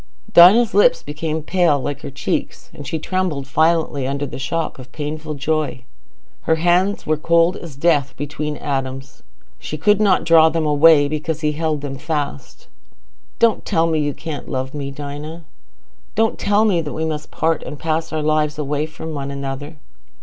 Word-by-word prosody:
Dinah's 215 +7 +7
lips 205 +5 +4
became 155 +1 -4
pale, 170 -4 +2
like 145 +1 -4
her - - -6
cheeks, 135 - -4
and 145 - -9
she 165 - -2
trembled 170 -4 -2
violently 155 -2 +1
under 140 +1 -2
the 135 - -7
shock 165 +2 -3
of 130 0 -12
painful 150 +1 -5
joy. 150 -3 -2 0.6
Her 160 - +2
hands 175 +4 +1
were 155 0 +1
cold 170 +3 +3
as 165 -6 -9
death 140 -3 +1
between 150 +1 -4
Adam's. 135 -1 -4 0.4
She 155 - -6
could 210 +6 +3
not 195 -3 +3
draw 160 -1 +6
them 160 0 -1
away, 150 0 +5
because 155 +1 -3
he 150 -1 +1
held 155 -1 -2
them 135 -2 -6
fast. 145 -3 -4 0.7
"Don't 230 -3 +2
tell 165 - +1
me 160 -2 +1
you 145 -1 -1
can't 160 -3 -7
love 130 +1 -3
me, 140 -2 -4
Dinah. 145 +4 -7 0.7
Don't 225 +1 +1
tell 205 +2 +2
me 185 -6 +2
we 155 +1 -3
must 155 -1 -4
part 160 -1 0
and 150 - -7
pass 160 +2 -2
our 155 -1 -2
lives 150 0 +1
away 150 +1 -2
from 160 0 -8
one 140 -1 -4
another." 140 +2 -6
155 Hz, 170 wpm, -20 LUFS, 145-165 Hz, 0.7 s, Dinah's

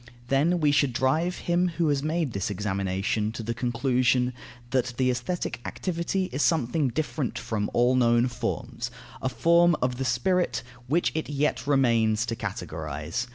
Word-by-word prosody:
Then 155 +6 +3
we 150 -2 +3
should 140 -3 +2
drive 155 +8 +1
him 175 +1 +2
who 165 -3 +2
has 140 -2 +1
made 155 -3 -1
this 100 - -2
examination 100 +1 -1
to 115 - -5
the 115 +2 -2
conclusion, 125 +1 +1 0.4
that 125 -2 0
the 130 -1 +3
aesthetic 125 +1 -3
activity 185 +1 -2
is 135 - -2
something 150 -2 +2
different 150 +1 -2
from 105 -2 -2
all 120 +1 +3
known 120 -1 +4
forms, 120 0 -4 0.3
a 130 - 0
form 170 +7 +4
of 125 -1 0
the 135 - -2
spirit, 150 +9 +1 0.2
which 165 +7 +2
it 160 -1 -3
yet 145 0 0
remains 115 -6 +3
to 115 -1 -3
characterize. 80 - -4
125 Hz, 155 wpm, -26 LUFS, 115-155 Hz, 0.4 s, known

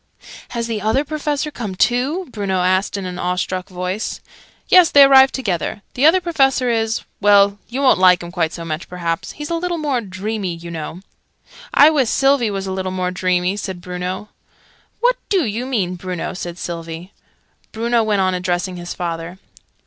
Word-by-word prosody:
"Has 235 -1 -3
the 225 -3 -3
Other 220 +8 +1
Professor 300 0 -2
come 215 -8 -5
too?" 265 - +1
Bruno 195 -4 -1
asked 185 +2 +1
in 195 - -5
an 180 0 -5
awe 180 0 -1
struck 185 0 -3
voice. 185 +3 -4 0.5
"Yes, 360 -3 +6
they 285 - +8
arrived 270 -1 +6
together. 205 -4 -2
The 275 +5 +4
Other 355 +4 +5
Professor 270 -8 +1
is 225 0 0 0.2
well, 200 0 +4
you 265 +4 -3
won't 260 - +5
like 180 -2 +5
him 170 - -8
quite 170 -3 0
so 170 - -7
much, 155 +1 -5
perhaps. 170 -2 -3
He's 295 +1 -7
a - - +1
little 350 +1 -2
more 285 -6 -1
dreamy, 195 -2 -4
you 170 0 -9
know." 165 +2 -6 0.7
"I 295 +2 +7
wiss 270 -7 +2
Sylvie 270 -4 +3
was 195 -1 -3
a 190 - -4
little 190 0 -3
more 185 -1 -2
dreamy," 185 +1 0
said 190 -3 -5
Bruno. 180 +3 -5 0.7
"What - - +3
do 380 -7 +2
you 230 +4 -3
mean, 190 -9 -1
Bruno?" 180 0 -4
said 175 -2 -6
Sylvie. 165 +1 -6 0.6
Bruno 235 +1 +1
went 210 -3 +1
on 185 0 +1
addressing 180 0 -2
his 175 0 -6
father. 170 0 -4
195 Hz, 180 wpm, -19 LUFS, 180-255 Hz, 0.7 s, they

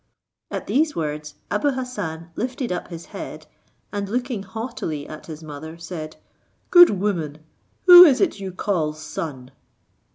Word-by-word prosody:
At - - -4
these 300 +2 +1
words 150 -1 -4 0.2
Abou 275 +7 +1
Hassan 205 -11 -5
lifted 250 0 -3
up 180 - -3
his 170 -1 -9
head, - - -7 0.5
and 200 -1 -3
looking 245 -1 -2
haughtily 195 - -5
at 155 - -10
his 160 -1 -8
mother, 155 +2 -8
said, 165 -2 -7 0.6
"Good 350 -1 +9
woman! 160 -7 -2 0.4
who 355 -1 +12
is 275 -6 +4
it 345 - +1
you 190 -1 -5
call 175 -5 -1
son?" 155 -4 -7
180 Hz, 140 wpm, -23 LUFS, 155-245 Hz, 0.6 s, who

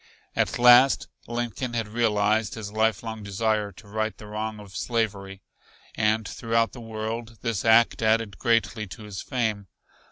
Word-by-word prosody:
At - - 0
last 125 +2 +6 0.2
Lincoln 120 +1 -3
had 115 -2 -1
realized 105 -1 +1
his 105 -2 -6
lifelong 110 0 -1
desire 105 +1 -1
to 105 - -15
right 110 +1 -2
the 105 - -11
wrong 105 +1 -4
of 100 -2 -12
slavery, 100 -5 -2 0.5
and 110 0 +1
throughout 115 +1 0
the 125 - -10
world 115 +1 -5
this 115 -5 -1
act 115 +1 +4
added 110 -2 +1
greatly 115 -1 +1
to 90 +4 -10
his 105 -3 -6
fame. 110 -5 -2
110 Hz, 150 wpm, -26 LUFS, 105-115 Hz, 0.5 s, last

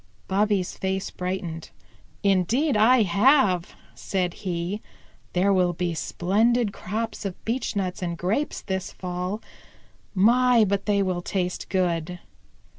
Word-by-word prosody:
Bobby's 200 -1 +1
face 190 0 -2
brightened. 180 -3 -4 0.5
"Indeed 205 - +2
I 225 +3 +5
have," 200 - +3 0.2
said 180 -3 -2
he. 180 +2 -3 0.5
"There 190 +3 +3
will 180 -2 +2
be 175 0 -2
splendid 210 +7 +1
crops 225 +4 -4
of 195 -3 -3
beechnuts 205 -6 -2
and 170 -2 -3
grapes 210 - -1
this 190 -1 -3
fall. 180 +3 -4 0.7
My, 235 +3 +5
but 200 +1 -1
they 200 -1 +3
will 180 -2 -1
taste 180 0 -3
good!" 180 -2 0
190 Hz, 115 wpm, -25 LUFS, 180-215 Hz, 0.7 s, I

